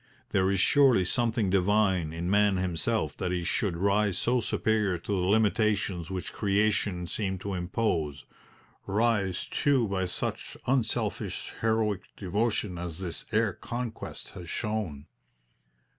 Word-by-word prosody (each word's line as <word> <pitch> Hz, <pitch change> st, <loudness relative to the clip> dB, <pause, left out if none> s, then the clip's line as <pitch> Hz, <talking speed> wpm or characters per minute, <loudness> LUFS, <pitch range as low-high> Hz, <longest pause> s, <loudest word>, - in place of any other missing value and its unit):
There 95 Hz, -1 st, +3 dB
is 100 Hz, -1 st, +1 dB
surely 130 Hz, -4 st, +5 dB
something 115 Hz, -1 st, +1 dB
divine 95 Hz, -3 st, +2 dB
in 85 Hz, +2 st, -4 dB
man 100 Hz, 0 st, +3 dB
himself 90 Hz, -3 st, -1 dB
that 90 Hz, -, -2 dB
he 90 Hz, -1 st, -1 dB
should 90 Hz, 0 st, 0 dB
rise 100 Hz, +1 st, +2 dB
so 125 Hz, +4 st, +2 dB
superior 105 Hz, -4 st, +1 dB
to 85 Hz, -, -7 dB
the 90 Hz, -2 st, +1 dB
limitations 105 Hz, -4 st, +2 dB
which 95 Hz, -2 st, -4 dB
Creation 100 Hz, -3 st, +1 dB
seemed 95 Hz, +1 st, -2 dB
to 100 Hz, -, -3 dB
impose 90 Hz, -, -1 dB, 0.6 s
rise, 100 Hz, -3 st, +1 dB
too, 135 Hz, -5 st, +2 dB
by 95 Hz, -2 st, -1 dB
such 90 Hz, -, -4 dB
unselfish, 125 Hz, -3 st, -1 dB
heroic 110 Hz, -3 st, +1 dB, 0.2 s
devotion 105 Hz, -1 st, -1 dB
as 85 Hz, -2 st, -4 dB
this 90 Hz, -3 st, -5 dB
air -, -, +2 dB
conquest 120 Hz, -2 st, -6 dB
has 85 Hz, -2 st, -9 dB
shown. 105 Hz, -10 st, -3 dB
100 Hz, 130 wpm, -28 LUFS, 90-110 Hz, 0.6 s, surely